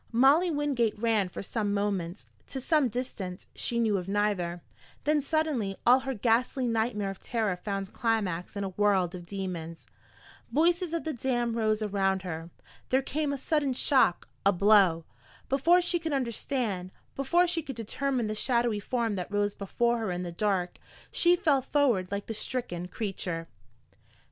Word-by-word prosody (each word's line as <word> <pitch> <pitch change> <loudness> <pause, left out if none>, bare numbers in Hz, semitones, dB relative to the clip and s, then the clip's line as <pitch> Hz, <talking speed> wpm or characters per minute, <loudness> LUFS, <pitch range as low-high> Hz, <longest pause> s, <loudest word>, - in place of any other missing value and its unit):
Molly 275 +9 +5
Wingate 285 -8 0
ran 215 -4 +1
for - - -6
some 205 0 -1
moments, 200 -3 -2 0.2
to 270 - -5
some 295 +1 +2
distance 210 -6 -5
she 235 - -1
knew 220 -3 +2
of 180 -1 -5
neither. 195 -4 0 0.4
Then 300 0 +2
suddenly 280 -10 -1
all 250 +2 +7
her 265 0 -4
ghastly 245 +4 +1
nightmare 220 -3 0
of 195 - -10
terror 220 -5 -1
found 195 +1 -4
climax 210 -7 -1
in 200 - -2
a 195 - -2
world 190 -2 +2
of 175 -1 -8
demons. 175 -4 -5 0.7
Voices 340 +2 +2
of 335 - -1
the 315 - -2
damned 240 -1 -1
rose 215 -1 +1
around 195 -2 0
her. 165 -2 -5 0.4
There 260 +1 +2
came 295 +1 -1
a 280 - -2
sudden 285 0 0
shock, 255 -8 +2 0.2
a 200 - +5
blow. 190 -4 +4 0.4
Before 335 +7 +4
she 350 0 +1
could 325 -2 -3
understand, 235 -6 -2 0.3
before 340 +7 +3
she 340 -1 -1
could 275 -4 -7
determine 245 +2 -1
the 215 - -2
shadowy 235 -1 +1
form 230 +1 -1
that 180 +1 -5
rose 205 0 +1
before 235 +4 0
her 220 -3 -2
in 180 0 -3
the 175 - -5
dark, 185 -1 -1 0.3
she 350 +1 +4
fell 305 -6 +2
forward 250 -10 +1
like 200 0 -3
the 225 - -4
stricken 210 -7 -3
creature. 180 -5 -3
220 Hz, 165 wpm, -29 LUFS, 195-265 Hz, 0.7 s, all